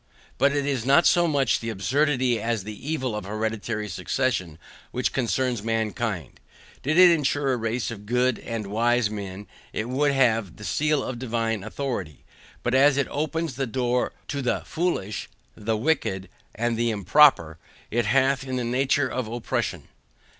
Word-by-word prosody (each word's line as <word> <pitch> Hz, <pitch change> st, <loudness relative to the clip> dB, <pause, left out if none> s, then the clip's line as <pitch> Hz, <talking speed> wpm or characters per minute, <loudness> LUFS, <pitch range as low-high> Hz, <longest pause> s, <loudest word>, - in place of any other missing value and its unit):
But 140 Hz, +2 st, +4 dB
it 145 Hz, -1 st, 0 dB
is 135 Hz, -5 st, -1 dB
not 140 Hz, +6 st, +5 dB
so 175 Hz, -1 st, +4 dB
much 140 Hz, -5 st, +2 dB
the 115 Hz, -, -4 dB
absurdity 125 Hz, +3 st, +1 dB
as 115 Hz, -3 st, -1 dB
the 110 Hz, +7 st, -8 dB
evil 130 Hz, -8 st, -1 dB
of 105 Hz, -, -5 dB
hereditary 110 Hz, +1 st, -3 dB
succession 95 Hz, -, -2 dB, 0.3 s
which 125 Hz, -, -1 dB
concerns 125 Hz, -2 st, 0 dB
mankind. 110 Hz, -, -2 dB, 0.4 s
Did 155 Hz, +5 st, 0 dB
it 180 Hz, -1 st, +9 dB
ensure 145 Hz, -3 st, +1 dB
a -, -, 0 dB
race 115 Hz, +1 st, -2 dB
of 105 Hz, -2 st, -9 dB
good 125 Hz, +1 st, +1 dB
and 115 Hz, -2 st, -4 dB
wise 115 Hz, +2 st, +1 dB
men 100 Hz, -1 st, -6 dB, 0.3 s
it 110 Hz, +3 st, -3 dB
would 140 Hz, +3 st, +2 dB
have 115 Hz, -8 st, +2 dB
the 105 Hz, -, -11 dB
seal 150 Hz, +4 st, +1 dB
of 125 Hz, -2 st, -5 dB
divine 115 Hz, -4 st, -1 dB
authority, 110 Hz, -, -5 dB, 0.4 s
but 125 Hz, -, 0 dB
as 135 Hz, +1 st, +5 dB
it 140 Hz, -, +2 dB
opens 155 Hz, -1 st, -2 dB
a 135 Hz, -, 0 dB
door 125 Hz, +1 st, 0 dB, 0.2 s
to 140 Hz, -1 st, -2 dB
the 125 Hz, -, 0 dB
FOOLISH, 160 Hz, -, -2 dB, 0.3 s
the 110 Hz, +1 st, -1 dB
WICKED, 105 Hz, -, -1 dB, 0.3 s
and 120 Hz, +1 st, 0 dB
the 120 Hz, 0 st, +1 dB
IMPROPER, 100 Hz, -, +4 dB, 0.3 s
it 120 Hz, -1 st, +1 dB
hath 135 Hz, +3 st, +3 dB
in 130 Hz, -1 st, -4 dB
it -, -, -1 dB
the 125 Hz, -, -1 dB
nature 135 Hz, +2 st, +2 dB
of 125 Hz, -2 st, -3 dB
oppression. 120 Hz, +1 st, -3 dB
120 Hz, 170 wpm, -25 LUFS, 110-135 Hz, 0.4 s, it